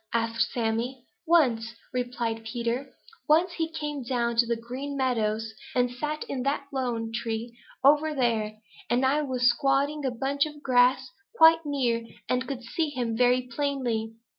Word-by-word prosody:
asked 230 0 +1
Sammy. 240 +2 -2 0.2
"Once," 235 -9 +3 0.2
replied 240 -2 -2
Peter. 240 +3 -3 0.4
"Once 335 +4 +4
he 325 -1 -2
came 295 -3 -4
down 235 -1 -1
to 235 0 +4
the 235 - +1
Green 255 +5 -6
Meadows 225 -4 0 0.2
and 245 -1 +2
sat 300 +5 -3
in 265 - -4
that 280 +2 0
lone 240 -4 -2
tree 230 0 -3 0.3
over 300 +3 +5
there, 225 -4 0 0.3
and 245 +3 +2
I 285 +3 +3
was 255 -4 +1
squatting 275 +4 +2
in 290 - -4
a - - -9
bunch 280 +4 0
of 295 -1 -12
grass 255 0 +3 0.2
quite 325 -4 +6
near 245 -5 0 0.2
and 255 0 0
could 265 -3 -5
see 310 +7 -1
him 245 -5 -2
very 250 +1 +3
plainly. 245 -4 -2
250 Hz, 160 wpm, -27 LUFS, 235-280 Hz, 0.4 s, quite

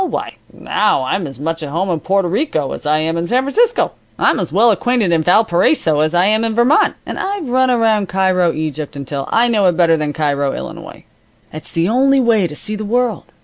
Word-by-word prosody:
Why, 375 - -4 0.2
now 210 -10 0
I'm 170 +6 -2
as 135 -1 -9
much 165 +2 -3
at 150 - -5
home 180 +5 -2
in 165 - -1
Porto 195 +2 0
Rico 170 - -1
as - - -6
I 150 +1 +2
am 160 +2 -1
in 170 +1 -2
San 255 +5 +1
Francisco. 460 - +1 0.3
I'm - - +2
as 180 -6 -3
well 225 +7 +4
acquainted 225 -2 0
in 165 -1 +2
Valparaiso 175 - +2
as 155 +3 0
I 175 +1 +3
am 215 +2 +3
in 225 -1 -2
Vermont, 240 +6 +3
and - - -6
I've 390 -5 -3
run 260 +1 +2
around 225 -5 +1
Cairo, 185 -2 +1
Egypt, 155 -2 -5
until 140 0 -5
I 235 +1 +3
know 210 -5 +2
it 175 - +1
better 165 -2 +3
than 150 -1 -2
Cairo, 145 -2 -1
Illinois. - - -9 0.5
It's 155 - -7
the 165 +1 0
only 270 +5 +3
way 225 -7 +2
to 150 - -10
see 215 +7 -3
the 215 - -5
world. 230 -2 -1
185 Hz, 220 wpm, -16 LUFS, 160-235 Hz, 0.5 s, well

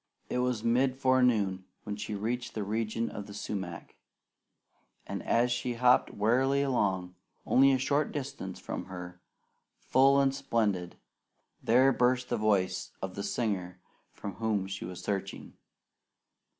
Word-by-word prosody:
It 125 - 0
was 125 -3 0
mid 125 +3 +2
forenoon 125 -8 +2 0.2
when 105 -1 -4
she 105 +1 -5
reached 120 +4 -3
the 110 - -2
region 110 +2 -1
of 100 -1 -7
the 100 - -9
sumac, 90 -5 -5 1.1
and - - -4
as 120 +1 +2
she 120 0 -1
hopped 125 +1 +4
warily 130 +6 +2
along, 95 -9 0 0.3
only 135 +1 +5
a 135 - +3
short 140 +3 0
distance 140 -2 -5
from - - -5
her, 90 -1 -9 0.6
full 135 +2 +4
and 135 -1 +3
splendid, 105 -9 -1 0.7
there 130 +4 +4
burst 125 0 +1
the 120 - 0
voice 100 -4 0
of 95 -1 -5
the 100 - -5
singer 95 -5 -2 0.3
for 100 - -6
whom 105 -2 -1
she 95 0 -5
was 90 0 -8
searching. 100 0 -4
110 Hz, 140 wpm, -30 LUFS, 100-125 Hz, 1.1 s, only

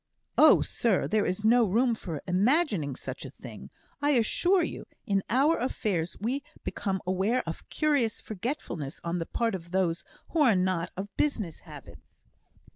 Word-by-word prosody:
"Oh, - - +7
sir! 225 -6 +1
there 215 -1 +1
is 185 +4 -2
no 240 +2 +6
room 230 +4 +2
for 170 -9 -6
imagining 195 - +2
such - - -6
a - - -7
thing, - - -11 0.3
I 290 0 +3
assure 350 - +3
you. - - -5 0.2
In 195 -1 +1
our 285 +6 +3
affairs 195 -9 -1
we 250 +7 -1 0.2
become 190 -2 -3
aware 190 +7 +1
of 165 0 -7
curious 285 -8 +1
forgetfulness 185 - -5
on 170 +1 -2
the 165 - -4
part 230 -1 0
of 170 -2 -6
those 180 -2 0 0.3
who 330 - -1
are 245 -8 +5
not 180 -2 0
of 200 +1 -6
business 215 - -1
habits." - - -14
210 Hz, 160 wpm, -28 LUFS, 180-250 Hz, 0.3 s, Oh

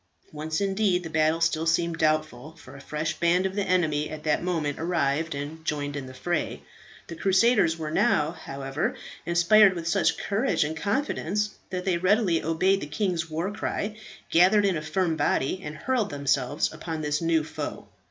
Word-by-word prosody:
Once, 155 +1 -3
indeed, 195 -2 +1
the 165 - -7
battle 160 +1 +2
still 165 -1 +1
seemed 165 0 +1
doubtful, 155 -1 0
for 165 - -14
a - - -11
fresh 155 +3 -3
band 175 +2 +3
of 190 - -1
the 205 - -1
enemy 160 -6 +1
at 155 0 -7
that 155 -1 +1
moment 160 -5 -2
arrived 160 -2 0
and 150 +3 -6
joined 145 -2 -2
in 135 -2 -5
the 130 - -10
fray. 175 +4 -2 0.4
The - - -8
crusaders 190 -2 +3
were 155 -1 -4
now, 155 -1 +2
however, 135 -3 -4 0.3
inspired 185 +4 +5
with 165 -1 -5
such 165 - +2
courage 215 - 0
and 155 +2 -3
confidence 210 - -1 0.2
that 180 -1 -4
they 180 -3 +1
readily 185 -2 +2
obeyed 185 +5 +2
the 145 - -5
king's 165 +1 -2
war 165 +5 -2
cry, 210 0 -3 0.4
gathered 190 +5 +5
in 195 -3 +2
a 155 - -2
firm 165 +1 -1
body, 150 +7 0
and 150 0 -6
hurled 245 -3 0
themselves 140 0 0
upon 160 -2 -5
this 150 +1 -1
new 165 -1 +2
foe. 155 - -6
165 Hz, 180 wpm, -26 LUFS, 155-185 Hz, 0.4 s, inspired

